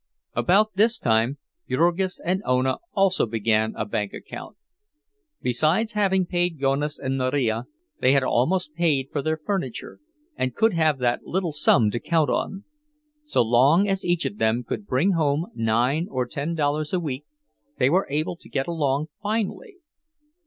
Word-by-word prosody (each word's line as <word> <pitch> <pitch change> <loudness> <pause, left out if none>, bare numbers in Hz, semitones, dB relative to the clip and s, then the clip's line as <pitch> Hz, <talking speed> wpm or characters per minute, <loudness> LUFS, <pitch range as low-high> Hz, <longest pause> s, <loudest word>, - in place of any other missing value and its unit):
About 210 +4 +3
this 225 +4 +3
time 115 - +1 0.3
Jurgis 175 +2 +1
and 185 +2 0
Ona 130 +1 +1 0.2
also 195 - +2
began 110 0 0
a - - -2
bank 105 -1 -3
account. - - -9 0.9
Besides 155 - +2
having 190 -3 +2
paid 175 -3 -1
Jonas 140 +2 0
and 135 0 -2
Marija, 130 -3 0 0.3
they 130 - +4
had 140 -1 +3
almost 150 +7 +1
paid 150 -5 +1
for 145 - -1
their 155 +3 -1
furniture, 155 - -4 0.4
and 130 -1 -2
could 225 0 +3
have 160 -3 +2
that 120 -2 -1
little 180 -2 -1
sum 125 -7 +3
to 120 - -2
count 160 0 +1
on. 195 +1 -2 0.6
So 300 - +1
long 135 - +4
as 195 0 -1
each 175 -1 0
of 205 - -4
them 115 +3 +1
could 205 - -5
bring 145 +10 +2
home 160 -1 0
nine 120 +8 +1
or 130 -1 -1
ten 145 +7 -4
dollars 150 +1 -1
a 185 - +2
week, 145 -4 -4 0.5
they 135 - +3
were 185 +3 +2
able 155 +4 -1
to - - -17
get 135 -1 -1
along 150 -4 0 0.2
finely. 220 - -3
150 Hz, 160 wpm, -24 LUFS, 130-185 Hz, 0.9 s, they